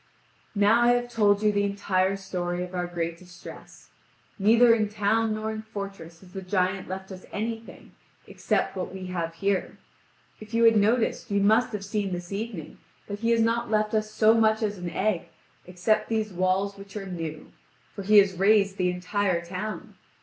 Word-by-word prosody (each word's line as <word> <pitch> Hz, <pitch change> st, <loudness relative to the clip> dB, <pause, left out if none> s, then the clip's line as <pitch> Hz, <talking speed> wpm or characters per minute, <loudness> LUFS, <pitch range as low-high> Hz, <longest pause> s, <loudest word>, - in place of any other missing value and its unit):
Now 210 Hz, +3 st, +4 dB
I 240 Hz, 0 st, +5 dB
have 245 Hz, 0 st, -1 dB
told 205 Hz, -2 st, +3 dB
you 210 Hz, -, +4 dB
the 205 Hz, 0 st, +1 dB
entire 195 Hz, -1 st, 0 dB
story 180 Hz, -2 st, -3 dB
of 180 Hz, 0 st, -8 dB
our 180 Hz, -1 st, -2 dB
great 170 Hz, -1 st, -4 dB
distress. 180 Hz, -1 st, -13 dB, 0.5 s
Neither 230 Hz, +4 st, +6 dB
in 215 Hz, -2 st, +1 dB
town 215 Hz, +1 st, +1 dB
nor 215 Hz, 0 st, -3 dB
in 215 Hz, 0 st, -5 dB
fortress 195 Hz, -6 st, -8 dB
has 185 Hz, -1 st, -17 dB
the 190 Hz, -, -5 dB
giant 185 Hz, 0 st, -1 dB
left 190 Hz, +1 st, -6 dB
us 185 Hz, -1 st, -10 dB
anything, 225 Hz, +1 st, -6 dB, 0.3 s
except -, -, -1 dB
what 185 Hz, -, -4 dB
we 190 Hz, 0 st, -7 dB
have 165 Hz, -2 st, -3 dB
here. 195 Hz, +2 st, -1 dB, 0.6 s
If 215 Hz, +1 st, -8 dB
you 230 Hz, -, +3 dB
had 225 Hz, -1 st, +6 dB
noticed, 225 Hz, +3 st, +1 dB
you 200 Hz, 0 st, +1 dB
must 220 Hz, +5 st, +3 dB
have 200 Hz, -1 st, -4 dB
seen 200 Hz, -2 st, -2 dB
this 175 Hz, +1 st, -6 dB
evening 200 Hz, -7 st, -6 dB, 0.3 s
that 205 Hz, 0 st, -6 dB
he 230 Hz, +1 st, 0 dB
has 230 Hz, -1 st, +3 dB
not 230 Hz, +1 st, +1 dB
left 215 Hz, 0 st, +1 dB
us 215 Hz, 0 st, 0 dB
so 215 Hz, +1 st, +4 dB
much 220 Hz, -1 st, +3 dB
as 205 Hz, -2 st, -2 dB
an 180 Hz, -1 st, -4 dB
egg, 190 Hz, -1 st, -1 dB, 0.4 s
except 215 Hz, +4 st, 0 dB
these 220 Hz, -3 st, -1 dB
walls 185 Hz, +2 st, 0 dB
which 200 Hz, +1 st, -9 dB
are 200 Hz, -, -5 dB
new; 165 Hz, -4 st, -6 dB, 0.4 s
for -, -, -6 dB
he 210 Hz, +2 st, +4 dB
has 200 Hz, -1 st, +6 dB
razed 200 Hz, +1 st, +3 dB
the 180 Hz, -1 st, +1 dB
entire 180 Hz, -1 st, -1 dB
town. 185 Hz, +5 st, -6 dB
200 Hz, 185 wpm, -26 LUFS, 185-215 Hz, 0.6 s, Neither